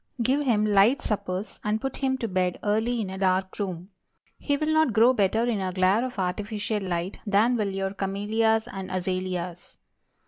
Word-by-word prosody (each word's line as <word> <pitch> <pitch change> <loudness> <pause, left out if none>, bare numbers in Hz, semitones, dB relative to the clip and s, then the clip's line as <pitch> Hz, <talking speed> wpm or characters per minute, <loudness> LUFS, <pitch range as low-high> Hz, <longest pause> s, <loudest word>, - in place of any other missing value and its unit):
Give 260 +5 +2
him 225 -7 +2
light 210 +6 +4
suppers, 195 -1 -3
and 210 +1 0
put 270 +3 -4
him 265 -1 0
to 240 -3 -3
bed 185 -2 0
early 220 +3 +1
in 190 -3 -4
a 190 - -6
dark 190 0 0
room. 185 -1 -4 0.5
He 285 -1 0
will 310 +2 0
not 315 -6 +3
grow 230 +4 +5
better 220 +1 +2
in 225 -5 0
a 185 -1 -2
glare 185 +5 +2
of 255 -3 -5
artificial 205 +3 -2
light 180 0 -3
than 215 +5 +3
will 210 -4 0
your 195 0 -3
camellias 215 +3 0
and 190 -1 -6
azalias. 185 -1 -3
205 Hz, 180 wpm, -26 LUFS, 185-230 Hz, 0.5 s, grow